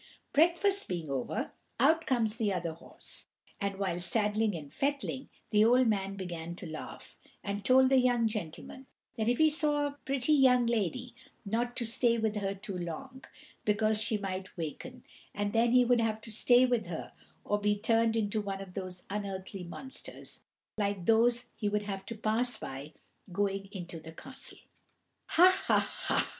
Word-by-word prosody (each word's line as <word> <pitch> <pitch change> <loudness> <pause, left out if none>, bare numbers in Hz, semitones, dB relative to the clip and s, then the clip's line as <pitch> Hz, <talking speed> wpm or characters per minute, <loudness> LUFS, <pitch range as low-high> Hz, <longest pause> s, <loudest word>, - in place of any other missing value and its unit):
Breakfast 345 +6 +3
being 170 -5 -4
over, 130 -2 -2 0.3
out 320 +6 +4
comes 230 -4 +1
the 215 -3 +1
other 170 -3 -2
horse, 165 - -11 0.3
and, 200 -1 -2
while 180 -3 -1
saddling 210 +2 +2
and 145 -4 -8
fettling, 275 -1 -2 0.2
the 210 -1 +5
old 250 +3 +5
man 195 -3 0
began 170 -3 -5
to 185 - -8
laugh, 160 -1 -8 0.2
and 200 0 -3
told 260 +3 +6
the 265 -1 +5
young 245 -2 +3
gentleman 215 +6 -6 0.3
that 225 -1 0
if 245 - +2
he 315 - +6
saw 295 -1 +2
a 285 0 -4
pretty 270 +2 +1
young 255 -4 +5
lady, 235 +2 -1 0.3
not 235 +4 -1
to 240 - -2
stay 235 +1 +2
with 220 -1 0
her 200 -1 -2
too 195 0 -6
long, 255 +10 -6 0.4
because 215 +1 +2
she 220 0 +1
might 190 -2 -5
waken, 240 - -6 0.3
and 205 0 -1
then 230 +2 +3
he 250 0 +6
would 245 0 +4
have 220 -1 0
to 225 - -6
stay 245 +3 +5
with 245 -6 0
her 165 -2 -5 0.3
or 205 - +1
to - - -14
be 205 0 +2
turned 225 +2 +2
into 215 -1 0
one 195 -1 -4
of 195 -2 -9
those 185 -2 -6
unearthly 195 -2 -5
monsters, 265 +10 -7 0.4
like 200 -4 -1
those 235 +3 +4
he 210 - -1
would 210 0 0
have 195 -1 -5
to 230 - -4
pass 225 +3 +1
by 135 +3 -7 0.4
going 195 +1 -1
into 175 -4 -6
the 160 +1 -10
castle. 260 +9 -9 0.7
"Ha! 370 +3 +6
ha! - - +5
ha! - - 0
215 Hz, 175 wpm, -31 LUFS, 195-245 Hz, 0.7 s, told